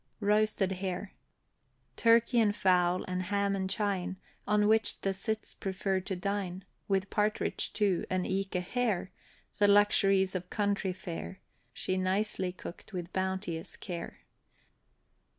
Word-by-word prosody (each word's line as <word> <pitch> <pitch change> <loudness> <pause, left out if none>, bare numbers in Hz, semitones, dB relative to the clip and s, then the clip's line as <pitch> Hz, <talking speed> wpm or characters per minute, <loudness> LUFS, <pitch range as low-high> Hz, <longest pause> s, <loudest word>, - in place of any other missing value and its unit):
ROASTED 210 -2 +2
HARE. 190 +1 -3 0.8
Turkey 235 +1 +4
and 210 -2 +3
fowl, 180 -2 +3
and 185 0 -2
ham 200 +1 0
and 190 -1 -2
chine, 195 -3 -1 0.3
On 210 0 +3
which 220 -1 +3
the 195 - 0
cits 220 +3 -3
prefer 190 0 -1
to 190 +1 -4
dine, 190 0 -3 0.2
With 195 0 0
partridge, 210 0 0
too, 200 -4 +1
and 185 -1 0
eke 195 0 -2
a 180 - +1
Hare, 205 -1 -1 0.5
The 205 - +6
luxuries 195 -2 +5
of 180 -1 -4
country 200 -2 0
fare, 185 0 -6 0.3
She 185 - -2
nicely 185 0 0
cooked 180 +2 -10
with 180 -1 -5
bounteous 190 -3 -2
care. 170 -3 -6
195 Hz, 135 wpm, -31 LUFS, 185-205 Hz, 0.8 s, The